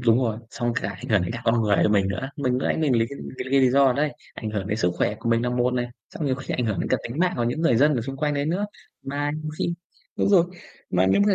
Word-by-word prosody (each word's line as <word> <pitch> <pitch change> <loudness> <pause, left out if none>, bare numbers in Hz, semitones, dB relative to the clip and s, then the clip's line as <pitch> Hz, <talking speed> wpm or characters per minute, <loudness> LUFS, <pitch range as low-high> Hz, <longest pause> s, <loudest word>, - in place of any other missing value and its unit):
đúng 115 -1 +4
rồi, 115 -4 0
xong 120 -3 -1
cả 100 - -1
ảnh 100 -1 -7
hưởng 105 -4 +3
đến 90 - -3
cả 115 - -5
con 115 0 +3
người 105 -2 +3
của - - +4
mình 100 -2 +3
nữa. 95 +8 -3
Mình 130 -4 0
lúc 125 - 0
nãy - - +1
mình 150 -6 +2
lấy 115 - +2
cái 140 - -7 0.2
lấy 130 - -4
cái 140 - +5
lý 130 -1 +5
do 135 0 +5
đấy - - -6
đấy, - - -12 0.2
ảnh 110 - -5
hưởng 100 -3 -3
đến 105 +1 -1
sức 90 -5 +2
khỏe - - +1
của 115 - -2
mình 115 0 +3
là 125 - 0
một 125 0 +1
này, 120 -1 0 0.3
xong 155 - -2
nhiều 130 - +2
khi 135 +1 -4
ảnh 125 - 0
hưởng 105 -5 -1
đến - - -2
cả - - +3
tính 120 +5 -6
mạng 180 +1 +3
của 120 - 0
những 120 +7 -1
người 165 -9 +4
dân 150 +4 +4
ở 125 - 0
xung 135 +4 -5
quanh 150 0 0
đấy 140 0 0
nữa. 185 +6 0 0.4
Mà 145 +1 -2
nhiều 155 - -4
khi 170 - 0 0.4
đúng - - +2
rồi. 185 -4 +6 0.5
Mà 90 +1 +3
nếu 95 - +4
mà, 200 - +4
125 Hz, 325 wpm, -24 LUFS, 110-140 Hz, 0.5 s, rồi